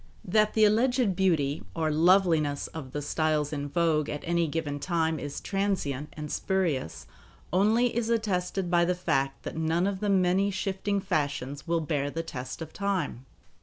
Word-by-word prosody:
That 215 +3 +2
the 220 -1 +6
alleged 230 -1 +2
beauty, 160 -6 +1
or 160 -2 0
"loveliness," 160 -3 +3
of 145 -5 -8
the 145 +1 -4
styles 155 0 0
in 145 -1 -3
vogue 155 -1 +1
at 150 - -4
any 170 -1 +1
given 145 -2 -3
time 160 -1 0
is 145 -1 -5
transient 185 -8 -2
and 150 -1 -6
spurious 170 - -1 0.5
only 220 +6 +3
is 230 -1 0
attested 190 -5 -1
by 175 -1 +4
the 180 +1 +1
fact 135 -6 -1
that - - -6
none 160 +2 +1
of 195 -1 -1
the 205 - -1
many 190 +1 +3
shifting 195 +1 -1
fashions 145 -6 -2
will 165 0 +1
bear 145 -3 -1
the 165 +3 -3
test 130 +1 -6
of 160 - -11
time. 195 -10 -2
170 Hz, 165 wpm, -28 LUFS, 150-195 Hz, 0.5 s, the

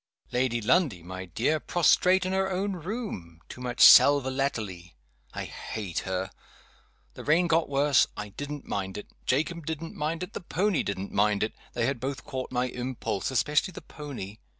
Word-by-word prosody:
Lady 125 -1 0
Lundie, 115 - +2
my 95 +1 -7
dear, 120 - 0
prostrate 180 +3 +3
in 185 - -1
her 190 0 +1
own 195 +2 -1
room 175 - -6
too 125 - -10
much 125 -1 -3
sal 145 0 +9
volatile. 130 -9 -2 0.5
I - - -3
hate 100 -6 -5
her. 95 0 -3 0.8
The - - -9
rain 165 +4 +3
got 165 -2 +2
worse. 140 -1 +4
I 105 0 -5
didn't 145 +7 -6
mind 95 -1 -3
it. 105 - -8 0.2
Jacob 155 +4 0
didn't 160 +1 -4
mind 160 +4 -2
it. 180 - -8
The - - -5
pony 185 +1 0
didn't 100 0 -4
mind 105 0 +2
it. 110 - -2 0.2
They 120 - 0
had 135 -1 -1
both 130 +1 -4
caught 130 -3 -5
my 125 0 +1
impulse 125 -4 -3
especially 150 - +1
the - - -8
pony. 130 -9 -8
135 Hz, 175 wpm, -28 LUFS, 105-160 Hz, 0.8 s, sal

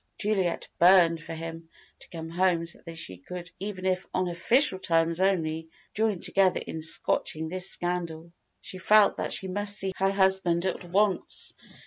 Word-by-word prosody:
Juliet 195 -5 -1
burned 170 -2 +5
for 165 - -7
him 165 0 -8 0.3
to - - -12
come 165 -2 -8
home 175 -1 +1
so 170 - -6
that - - -43
they 95 - -7
could 180 - -9
even 190 -1 -6
if 185 0 -1
"on 185 0 0
official 230 +5 +3
terms 165 0 +1
only" 165 -4 0 0.2
join 215 -3 0
together 190 0 +2
in 160 - -7
scotching 160 0 0
this 185 +1 -1
scandal. 170 -2 -3 0.3
She 185 - -8
felt 210 +2 +4
that - - -3
she 190 - -3
must 205 +2 0
see 190 -1 -1
her 195 0 +2
husband 190 -3 +1
at 185 - -2
once. 190 +1 -1
180 Hz, 165 wpm, -27 LUFS, 165-190 Hz, 0.3 s, burned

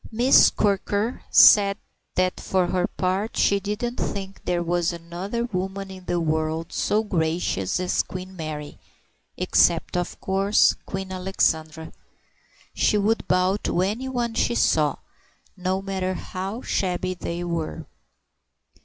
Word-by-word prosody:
Miss 245 +4 +6
Quirker 205 +3 0
said 200 -1 +7 0.4
that 185 0 +1
for 185 -1 +1
her 180 0 0
part 190 +4 -2
she 200 - +3
didn't 210 +5 -3
think 195 -1 -5
there 175 -1 0
was 175 0 0
another 175 +7 -4
woman 195 -2 -4
in 185 -1 -11
the 175 - 0
world 160 0 -1
so 215 +1 +1
gracious 160 - -1
as 185 0 +1
Queen 185 +1 -8
Mary—except 155 0 -2
of 175 -1 -3
course 195 +2 +3
Queen 190 0 -5
Alexandra. 160 -4 -1 0.8
She 210 - +2
would 215 +3 0
bow 185 +2 +2
to 180 -3 -1
anyone 240 +3 -2
she 235 - +1
saw, 150 -8 +2 0.6
no 185 +1 -2
matter 190 -1 -2
how 195 +7 -5
shabby 185 -1 -1
they 175 -1 -5
were. 170 -2 -4
185 Hz, 125 wpm, -24 LUFS, 175-200 Hz, 0.8 s, said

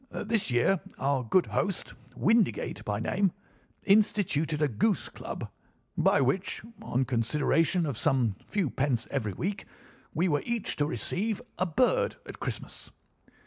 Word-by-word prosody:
This 220 -5 0
year 125 +10 +3 0.2
our 135 -1 +1
good 175 +10 +3
host, 195 -3 -1 0.2
Windigate 210 - +2
by 105 0 -2
name, 190 - +1 0.5
instituted 195 -7 +3
a 150 - +3
goose 160 - 0
club, - - -6 0.5
by - - +4
which, 140 +9 0 0.2
on 130 +2 0
consideration 150 +8 +2
of 140 -5 -2
some 120 -4 +2
few 190 -10 0
pence 130 -4 0
every 110 -8 -1
week, 195 - -3 0.5
we 175 +4 +1
were 145 -4 +1
each 235 -2 -1
to 145 - +1
receive 190 - -1 0.2
a 185 - +2
bird 480 - +2
at - - -9
Christmas. - - -5
155 Hz, 140 wpm, -29 LUFS, 130-195 Hz, 0.5 s, by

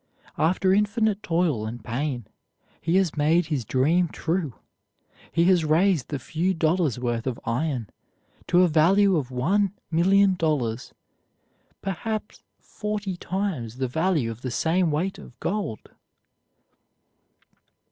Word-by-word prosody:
After 185 +4 +3
infinite 210 +1 +1
toil 165 - 0
and 115 0 -7
pain, 125 0 -3 0.6
he 165 +3 0
has 190 -4 +2
made 155 +4 +3
his 150 -6 -2
dream 155 +10 +2
true; 160 -4 -2 0.8
he 170 - +2
has 180 -2 +4
raised 160 -1 +2
the 145 - -2
few 165 +8 -1
dollars' 160 -5 +1
worth 120 -1 -2
of 125 -2 -2
iron 125 -1 -1 0.6
to 180 +1 +5
a - - +5
value 185 +5 +4
of 140 -6 -1
one 185 +10 +1 0.2
million 190 +4 +4
dollars, 145 -9 -1 0.9
perhaps 210 +3 -4
forty 210 -3 -4
times 175 - -3
the 130 0 -1
value 160 -3 0
of 115 +1 -10
the 130 - -3
same 165 +8 +1
weight 170 +6 -1
of 125 - -14
gold. 195 - -3
165 Hz, 125 wpm, -25 LUFS, 130-190 Hz, 0.9 s, to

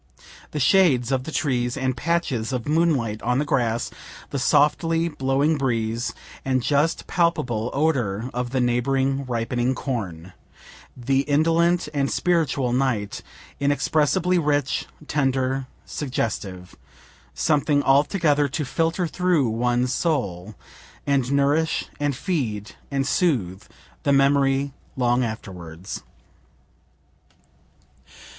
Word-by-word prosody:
The 150 - -4
shades 135 -5 +4
of 130 -1 0
the - - -5
trees, 125 -5 0
and 130 -1 -1
patches 140 -5 -1
of 125 -1 -3
moonlight 145 -9 +1
on 125 +1 +1
the 145 - +1
grass 120 -5 0 0.4
the - - -2
softly 165 +3 +2
blowing 140 +1 +1
breeze, 115 -2 -1 0.3
and 130 -2 0
just 150 +5 +1
palpable 125 - 0
odor 125 -8 0
of 125 0 -2
the 130 +1 -1
neighboring 135 +3 +1
ripening 120 +1 -1
corn 95 - -4 0.6
the 135 +2 +1
indolent 165 +4 +3
and 140 -2 0
spiritual 150 -8 +1
night, 125 -6 -1 0.4
inexpressibly 155 +5 +2
rich, 145 -3 0 0.2
tender, 135 -2 0 0.2
suggestive 100 -9 -4 0.6
something 145 - +2
altogether 145 +1 +3
to 140 +3 -3
filter 165 +5 0
through 170 -6 +1
one's 120 +2 0
soul, 105 - -1 0.5
and 135 -2 +1
nourish 145 +3 +2
and 145 -2 0
feed 125 - -2 0.2
and 135 -1 -1
soothe 105 - 0 0.4
the 140 - +1
memory 140 0 +3 0.2
long 125 0 +2
afterwards. 90 -6 -6
135 Hz, 110 wpm, -23 LUFS, 120-150 Hz, 0.6 s, shades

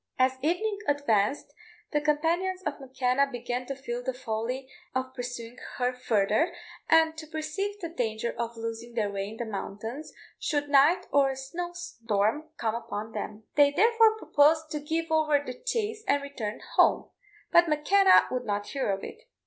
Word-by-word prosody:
As 260 0 +2
evening 400 +8 0
advanced, 285 -2 +1 0.4
the 295 - +1
companions 335 +5 0
of - - -3
M'Kenna 265 0 +1
began 245 0 -4
to 275 - -3
feel 245 -2 -5
the 260 0 -3
folly 250 +2 -3 0.3
of 260 0 -2
pursuing 245 -1 -6 0.2
her 250 0 +1
farther, 250 - +1 0.3
and 320 0 +5
to 310 - -9
perceive 325 +7 -3
the 345 - -4
danger 235 -7 -2
of 235 0 -3
losing 230 +1 -6
their 210 -3 0
way 195 0 -3
in 220 - -9
the 235 - -3
mountains 220 +6 -6 0.3
should 290 -2 -1
night 300 +6 +5
or 280 -1 +4
a 265 - -3
snow 340 +7 -5
storm 230 - -1
come 220 -1 -1
upon 225 -2 -5
them. 215 0 -6
They 290 -1 +6
therefore 445 +6 +4
proposed 315 -4 +3
to 300 - -2
give 320 +2 -2
over 310 -2 +4
the 280 -3 -5
chase 445 - -3
and 285 0 +2
return 235 -6 -5 0.2
home; - - +4 0.4
but 345 0 +6
M'Kenna 375 +6 +5
would 255 -1 -1
not 205 -1 -2
hear 270 -6 -2
of 195 0 -1
it. - - -9
275 Hz, 170 wpm, -28 LUFS, 235-320 Hz, 0.4 s, They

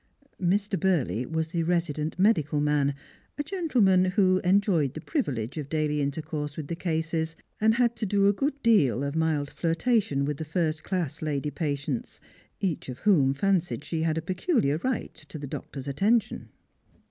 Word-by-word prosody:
Mr. 195 +2 +1
Burley 130 - +1
was 160 0 -2
the 170 0 -1
resident 165 -2 -1
medical 160 -7 +3
man, 145 -1 +1 0.4
a 290 - -1
gentleman 250 - +2
who 185 0 +3
enjoyed 180 - +2
the - - -4
privilege 140 - -2
of 140 -2 -6
daily 155 -1 0
iatercourse 150 +1 -3
with 150 -3 -5
the 170 - -2
cases, 160 -1 -2 0.2
and 220 +1 +4
had 240 -1 +2
to 220 -2 -3
do 200 0 +3
a 200 - +5
good 280 +6 -1
deal 150 - +4
of 140 +1 -3
mild 160 -3 0
flirtation 165 - +1
with 145 0 -2
the 160 - -4
first 160 0 -1
class 180 -7 -2
lady 150 -1 -2
patients, 145 - -3 0.4
each 180 -9 -2
of 125 - -5
whom 155 -11 +4
fancied 175 -2 0
she 160 0 -3
had 160 -1 0
a 160 - -2
peculiar 185 - +1
right 255 +5 -2
to - - -11
the 145 - -6
doctor's 135 0 -7
attention. 205 - +1
160 Hz, 170 wpm, -27 LUFS, 145-195 Hz, 0.4 s, a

